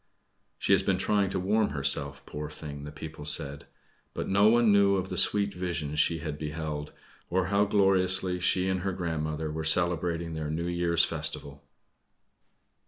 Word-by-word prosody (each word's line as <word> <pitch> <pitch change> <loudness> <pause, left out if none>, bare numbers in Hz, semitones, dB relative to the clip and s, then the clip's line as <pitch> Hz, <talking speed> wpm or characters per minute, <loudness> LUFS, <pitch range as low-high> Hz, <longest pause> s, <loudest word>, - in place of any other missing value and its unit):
"She - - +1
has - - +4
been 95 - 0
trying 100 0 +1
to 95 - -2
warm 105 +3 +1
herself, 70 0 -1
poor 75 0 -6
thing!" 75 -2 -8
the 75 - -8
people 80 +1 -9
said; 70 -1 +3 0.5
but - - -4
no 100 +2 +4
one 120 -1 +4
knew 100 -1 +4
of 95 0 -3
the - - -4
sweet 100 -1 +2
visions 85 -5 -3
she 85 +1 +2
had 75 -1 -6
beheld, 75 -1 -5 0.4
or 95 0 0
how 100 +1 +4
gloriously 95 -2 +2
she 90 +1 +1
and 95 0 0
her 95 +1 -3
grandmother 80 -3 -3
were 80 +1 -4
celebrating 85 0 +1
their 80 -1 -4
New 80 +2 -3
Year's 85 -1 +2
festival. 70 -1 -5
85 Hz, 170 wpm, -28 LUFS, 75-95 Hz, 0.5 s, has